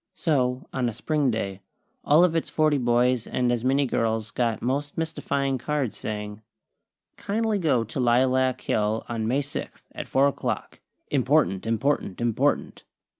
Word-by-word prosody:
So, 130 -5 0
on 125 -2 0
a 110 - -7
Spring 150 -4 0
day, 100 -4 -3 0.4
all 155 +4 +5
of 175 -2 +2
its 165 - -1
forty 155 -2 +2
boys 120 0 +2
and 125 -1 0
as 120 -1 -1
many 135 +2 +2
girls 110 -3 -1
got 115 -2 0
most 140 +4 -2
mystifying 140 -4 -1
cards, 145 -3 -2
saying: 105 0 -5 0.8
"Kindly 215 0 -1
go 140 -9 +2
to 115 +4 -6
Lilac 130 +1 +2
Hill 105 +1 0
on 115 -2 -2
May 135 +5 +1
sixth, 140 - -7
at - - -6
four 135 +1 +3
o'clock. 140 - -3 0.3
IMPORTANT! 95 +3 +2
IMPORTANT! 115 -3 0
IMPORTANT!!" 120 -2 0
125 Hz, 150 wpm, -25 LUFS, 115-145 Hz, 0.8 s, all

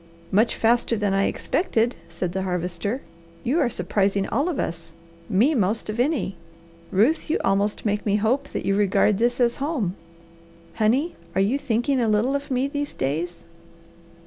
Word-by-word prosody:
"Much 215 +5 +3
faster 235 0 +2
than 205 -2 0
I 195 0 +2
expected," 240 - 0
said 170 +1 -3
the 190 +2 -2
Harvester. 185 +6 -2 0.4
"You 280 +8 +1
are 270 -6 +3
surprising 200 -3 0
all 290 +6 +1
of 325 - -2
us, 165 -5 -4 0.3
me 225 +9 +3
most 215 -2 0
of 215 - -6
any. 245 - 0 0.5
Ruth, 240 +13 +2
you 315 - +1
almost 200 +3 +1
make 210 -1 0
me 205 -1 +1
hope 245 +7 +1
that - - -5
you 195 - +2
regard 200 0 +3
this 240 +2 +1
as 240 -1 +2
home. 270 - -1 0.8
Honey, 255 +10 +1 0.2
you 195 +7 +2
are - - +2
thinking 255 0 0
a 230 - +2
little 220 +6 +2
of 280 0 -3
me 260 +1 +1
these 285 0 -4
days?" 160 +6 -2
220 Hz, 170 wpm, -24 LUFS, 195-265 Hz, 0.8 s, Much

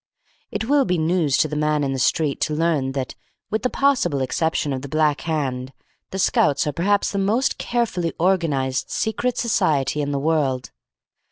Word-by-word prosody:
It - - -3
will 285 +3 +3
be 180 -5 0
news 160 -3 +1
to - - +3
the 150 - -5
Man 150 0 +1
in 135 -1 -1
the 135 - -3
Street 145 +2 +1
to 150 - 0
learn 150 -5 0
that, 130 -2 -3 0.4
with 220 0 0
the 250 - 0
possible 250 - +1
exception 145 +2 0
of 130 - -3
the 140 - -8
Black 155 0 +1
Hand, 135 -4 -2 0.4
the 190 - -5
Scouts 150 -6 +2
are 150 - 0
perhaps 200 +6 +1
the 200 - -1
most 220 +7 +1
carefully 200 -9 -1
organised 155 -8 +1
secret 235 +2 -1
society 155 - +1
in 145 - -2
the 140 - -1
world. 140 -4 0
155 Hz, 180 wpm, -22 LUFS, 140-190 Hz, 0.4 s, will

